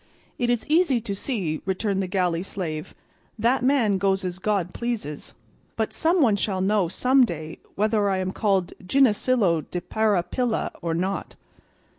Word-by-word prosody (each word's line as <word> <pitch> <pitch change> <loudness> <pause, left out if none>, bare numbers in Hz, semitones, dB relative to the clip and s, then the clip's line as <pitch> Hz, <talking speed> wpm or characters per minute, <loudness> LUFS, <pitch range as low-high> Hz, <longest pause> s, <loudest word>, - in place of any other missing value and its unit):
"It 240 -1 +1
is 240 -2 0
easy 305 -5 +3
to 210 -3 -4
see," 195 - -2
returned 195 +1 -1
the 190 - -2
galley 180 -3 0
slave, 165 -5 -5 0.4
"that 235 +4 +2
man 245 -7 +2
goes 195 0 +1
as 180 0 -4
God 190 -3 -1
pleases, 225 -12 -4 0.4
but - - -2
some 335 0 +2
one 220 -5 +4
shall 195 -1 -1
know 195 -1 +2
some 255 +9 +3
day 160 -7 -4 0.2
whether 210 0 +2
I 190 - +1
am 185 0 -2
called 195 -4 0
Ginesillo 215 - +3
de 180 - -3
Parapilla 215 +4 0
or 165 -1 -1
not." 190 +3 -3
200 Hz, 155 wpm, -24 LUFS, 180-235 Hz, 0.4 s, one